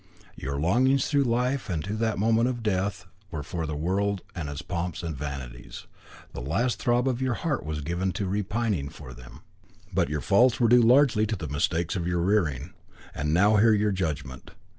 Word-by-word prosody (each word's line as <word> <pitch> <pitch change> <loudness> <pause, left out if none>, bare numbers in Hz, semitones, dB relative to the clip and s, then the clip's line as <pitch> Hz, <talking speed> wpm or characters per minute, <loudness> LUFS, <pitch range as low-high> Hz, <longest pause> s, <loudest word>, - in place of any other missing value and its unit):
Your 70 +1 -4
longings 130 - +3
through 140 -2 +2
life, 125 +2 0
and 80 -5 -2
to 100 - -4
the 110 0 -1
moment 115 +4 +2
of 120 -2 -4
death, 95 -3 -1 0.2
were 80 -5 -5
for 80 +1 -4
the 75 - -3
world 95 +5 -1
and 80 -5 -5
its 70 -1 -6
pomps 90 -2 -4
and 80 -2 -3
vanities. 70 -4 -7 0.5
The - - -6
last 115 - -1
throb 120 +1 +1
of 130 -1 -1
your 130 -2 0
heart 155 -7 -2
was 75 -1 -4
given 85 +5 -1
to 100 - -2
repining 100 -4 -1
for 70 -4 -11
them. - - -13 0.5
But - - +1
your 75 -1 -2
faults 120 +5 +4
were 120 -2 +4
due 120 +1 +7
largely 120 -2 +4
to 110 - -1
the 80 -5 -6
mistakes 80 +5 -1
of 85 -2 -2
your 85 -1 0
rearing. 85 -6 0 0.4
And 75 +1 -2
now 100 +6 +4
hear 110 +2 +5
your 105 0 +2
judgment. 75 -9 -4
95 Hz, 195 wpm, -26 LUFS, 75-115 Hz, 0.5 s, due